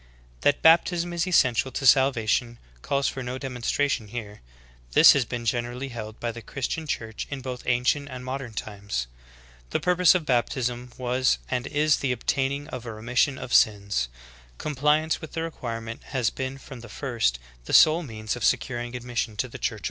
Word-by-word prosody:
That 145 Hz, -, +2 dB
baptism 170 Hz, +1 st, +4 dB
is 170 Hz, +1 st, -1 dB
essential 130 Hz, -7 st, +3 dB
to 135 Hz, -, -3 dB
salvation 120 Hz, -3 st, +3 dB, 0.2 s
calls 140 Hz, -, 0 dB
for 135 Hz, -, -3 dB
no 125 Hz, +1 st, -4 dB
demonstra 130 Hz, +1 st, -1 dB
tion 120 Hz, -6 st, -2 dB
here; 105 Hz, -2 st, -7 dB, 0.5 s
this -, -, +9 dB
has 135 Hz, -3 st, +1 dB
been 120 Hz, 0 st, -5 dB
generally 120 Hz, +3 st, -2 dB
held 110 Hz, -3 st, -7 dB
by 120 Hz, -, -2 dB
the 120 Hz, +1 st, -9 dB
Christian 140 Hz, +7 st, -4 dB
Church 110 Hz, -6 st, -4 dB
in 140 Hz, -2 st, -5 dB
both 125 Hz, -1 st, -5 dB
ancient 125 Hz, +4 st, +1 dB
and 125 Hz, -1 st, -8 dB
modern 130 Hz, -2 st, -5 dB
times.'* 100 Hz, -, -4 dB, 0.6 s
The -, -, 0 dB
purpose 180 Hz, 0 st, +4 dB
of 175 Hz, -4 st, 0 dB
baptism 125 Hz, -1 st, -1 dB
was 125 Hz, +1 st, +1 dB
and 125 Hz, 0 st, -1 dB
is 150 Hz, 0 st, +2 dB
the 135 Hz, -, -1 dB
obtaining 135 Hz, +3 st, -1 dB
of 125 Hz, -5 st, -7 dB
a -, -, -4 dB
remission 125 Hz, +5 st, +1 dB
of 120 Hz, -, -6 dB
sins; 100 Hz, -, +3 dB, 0.5 s
compliance 150 Hz, +3 st, +1 dB
with 160 Hz, -, -9 dB
the 165 Hz, -, -2 dB
requirement 115 Hz, -8 st, -5 dB
has 125 Hz, -5 st, 0 dB
been 130 Hz, 0 st, -4 dB
from 135 Hz, -1 st, -11 dB
the 120 Hz, -, -11 dB
first 115 Hz, -, -1 dB, 0.3 s
the -, -, -6 dB
sole 155 Hz, +2 st, +7 dB
means 110 Hz, -7 st, -4 dB
of 120 Hz, -, -6 dB
securing 120 Hz, +2 st, 0 dB
admission 120 Hz, -3 st, -3 dB
to -, -, -1 dB
the -, -, -10 dB
Church -, -, -2 dB
of -, -, +3 dB
Christ. -, -, -9 dB
125 Hz, 185 wpm, -26 LUFS, 115-140 Hz, 0.6 s, this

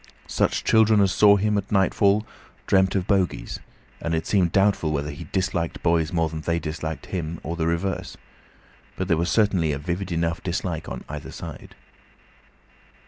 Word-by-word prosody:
Such -, -, 0 dB
children 110 Hz, -1 st, +4 dB
as 100 Hz, -2 st, +4 dB
saw 100 Hz, +2 st, +6 dB
him 105 Hz, +1 st, +1 dB
at 100 Hz, -, -8 dB
nightfall 100 Hz, +1 st, +3 dB, 0.4 s
dreamt 95 Hz, 0 st, +3 dB
of 95 Hz, -2 st, 0 dB
bogies, 95 Hz, -3 st, 0 dB, 0.4 s
and 85 Hz, 0 st, -1 dB
it 80 Hz, -, -2 dB
seemed 90 Hz, -5 st, +2 dB
doubtful 95 Hz, -5 st, +2 dB
whether 75 Hz, 0 st, -2 dB
he 75 Hz, +4 st, -8 dB
disliked 90 Hz, -1 st, -2 dB
boys 85 Hz, -2 st, +2 dB
more 80 Hz, -2 st, +1 dB
than 80 Hz, 0 st, -6 dB
they 85 Hz, +1 st, 0 dB
disliked 80 Hz, -1 st, -5 dB
him, 85 Hz, -3 st, -4 dB
or 85 Hz, +2 st, -3 dB
the 80 Hz, -1 st, -1 dB
reverse; 85 Hz, +3 st, -2 dB, 0.8 s
but 95 Hz, -, -3 dB
there 85 Hz, -, +3 dB
was 85 Hz, +2 st, 0 dB
certainly 95 Hz, -8 st, +2 dB
a -, -, -2 dB
vivid 90 Hz, +5 st, -4 dB
enough 85 Hz, 0 st, -1 dB
dislike 85 Hz, -3 st, -3 dB
on -, -, -6 dB
either 75 Hz, 0 st, -7 dB
side. -, -, -9 dB
85 Hz, 170 wpm, -24 LUFS, 80-100 Hz, 0.8 s, saw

